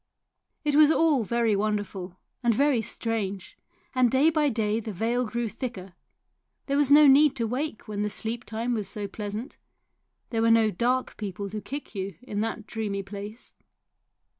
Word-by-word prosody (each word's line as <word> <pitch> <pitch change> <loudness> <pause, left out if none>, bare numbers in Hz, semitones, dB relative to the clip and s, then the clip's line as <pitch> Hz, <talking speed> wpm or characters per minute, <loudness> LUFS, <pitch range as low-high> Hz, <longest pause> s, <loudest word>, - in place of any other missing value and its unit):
It 295 -1 +1
was 300 0 +7
all 315 -6 +3
very 230 0 +1
wonderful 200 -3 -2 0.2
and 235 -3 +2
very 275 -2 +3
strange, 205 -4 -3 0.4
and 255 -2 +4
day 275 +6 +4
by 305 -2 +2
day 220 -2 0
the 220 -1 -5
veil 230 +6 0
grew 235 +2 -2
thicker; 205 -6 -6 0.7
there 280 - -1
was 285 -1 +3
no 295 +1 +8
need 285 +1 +6
to 235 -3 -1
wake 250 +1 -3
when 205 -1 -3
the 210 - 0
sleeptime 230 +2 -3
was 215 -4 -2
so 205 -1 -4
pleasant; 210 +4 -6 0.7
there 225 -2 0
were 230 - +4
no 225 -1 +5
dark 250 +7 0
people 200 -1 -5
to 215 0 -4
kick 280 +1 -7
you 195 -2 -4
in 210 -4 -3
that 225 -1 -3
dreamy 210 -3 -3
place. 205 +3 -9
225 Hz, 165 wpm, -27 LUFS, 205-255 Hz, 0.7 s, no